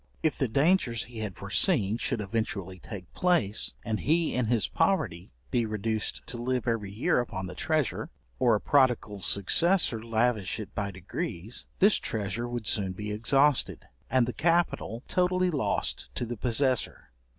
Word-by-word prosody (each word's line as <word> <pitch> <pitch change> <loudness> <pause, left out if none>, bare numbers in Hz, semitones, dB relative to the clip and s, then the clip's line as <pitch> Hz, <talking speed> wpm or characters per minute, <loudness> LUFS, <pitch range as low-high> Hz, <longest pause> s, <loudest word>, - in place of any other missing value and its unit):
If 160 - +2
the 135 - 0
dangers 135 - +2
he 120 -2 -9
had 105 -4 -4
foreseen 105 +3 +2
should 110 - -1
eventually 100 -3 -3
take 90 -2 -9
place, 120 - +1
and 110 -2 -1
he 160 +2 +1
in 125 -3 0
his 115 -2 +2
poverty 90 - 0 0.2
be 120 - +2
reduced 110 0 -2
to 120 - -5
live 125 -1 -1
every 110 -4 -1
year 110 +4 +1
upon 95 -6 -3
the 90 - -7
treasure, 155 - -1 0.3
or 115 -2 +4
a - - 0
prodigal 125 -7 +2
successor 115 - +2
lavish 115 -3 0
it 105 - -7
by 100 -1 -2
degrees, 95 +3 -5
this 200 +2 +5
treasure 110 +2 -3
would 120 -2 -4
soon 95 -1 +1
be 105 +2 -5
exhausted, 135 +6 +2 0.2
and 130 -2 +3
the 125 - -3
capital 165 - 0
totally 180 0 +2
lost 145 -5 -1
to - - -2
the 120 +1 -4
possessor. 125 - 0
115 Hz, 160 wpm, -28 LUFS, 105-135 Hz, 0.3 s, this